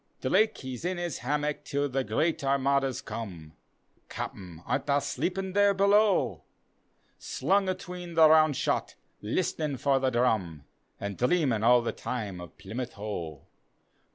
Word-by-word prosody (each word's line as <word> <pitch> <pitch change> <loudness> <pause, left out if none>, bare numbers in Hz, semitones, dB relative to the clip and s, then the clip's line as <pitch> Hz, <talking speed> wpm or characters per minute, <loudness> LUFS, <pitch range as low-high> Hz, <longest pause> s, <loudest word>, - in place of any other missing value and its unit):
Drake 220 0 +2
he's 130 -1 -7
in 180 +1 -1
his 175 -1 -3
hammock 150 +4 -2
till 145 0 -1
the 135 0 -1
great 155 +2 0
Armadas 135 -1 +1
come, 85 -9 -7 0.6
(Capten, 90 -3 -7
art 140 - -1
tha 140 0 +3
sleepin' 190 +5 -3
there 200 0 +4
below?) 200 +1 +3 0.8
Slung 195 0 +1
atween 180 -2 -6
the 160 -1 +8
round 155 -2 +5
shot, - - -1 0.3
listenin' 150 - -1
for 135 +1 +2
the 130 0 +1
drum. 110 - 0 0.4
An' 100 0 -4
dreamin' 125 -4 +2
all 120 +1 +5
the 115 - -1
time 105 -7 -5
of 90 - -11
Plymouth 120 +5 -6
Hoe. 85 -8 -6
135 Hz, 140 wpm, -28 LUFS, 115-170 Hz, 0.8 s, the